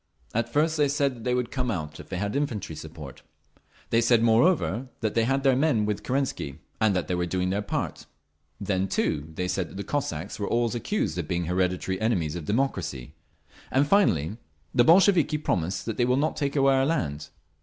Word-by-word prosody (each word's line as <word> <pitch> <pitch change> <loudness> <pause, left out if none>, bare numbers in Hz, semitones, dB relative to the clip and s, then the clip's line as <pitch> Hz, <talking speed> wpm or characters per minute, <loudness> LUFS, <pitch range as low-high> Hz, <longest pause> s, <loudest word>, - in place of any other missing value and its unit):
At 115 +1 -1
first 155 +3 +2
they 145 -1 +3
said 140 -5 -1
they 125 0 +1
would 125 0 -2
come 125 -2 -1
out 80 -7 -4
if - - -11
they 95 - -3
had 100 +4 -2
infantry 120 - -2
support. 75 -3 -9 0.7
They 115 - +4
said 115 -1 +4
moreover 120 - +3
that 110 -2 0
they 115 -1 +2
had 135 +2 +1
their 135 -2 +4
men 135 -6 +2
with 105 -1 -2
Kerensky, 130 - -2 0.2
and 110 -3 +3
that 90 - -1
they - - -1
were 90 0 0
doing 90 +1 -1
their 100 +2 0
part…. 105 - -4 0.5
Then, 95 -1 0
too, 80 -4 -1
they 90 +1 -2
said 90 -2 -2
that - - -10
the 100 - -3
Cossacks 100 - -3
were 100 - -2
always 120 0 +1
accused 120 - -1
of 80 - -3
being 85 0 -1
the 85 - -4
hereditary 90 +1 0
enemies 90 -9 0
of 85 -3 -5
democracy…. 80 - -2 0.6
And 135 +2 +3
finally, 105 - +2 0.4
'The 120 - +5
Bolsheviki 170 0 +5
promise 95 - -1
that 115 - -4
they 120 - +3
will 125 +1 +2
not 150 +3 0
take 140 -1 -2
away 135 -1 +4
our 135 0 +3
land. 75 - -2
110 Hz, 205 wpm, -26 LUFS, 90-135 Hz, 0.7 s, The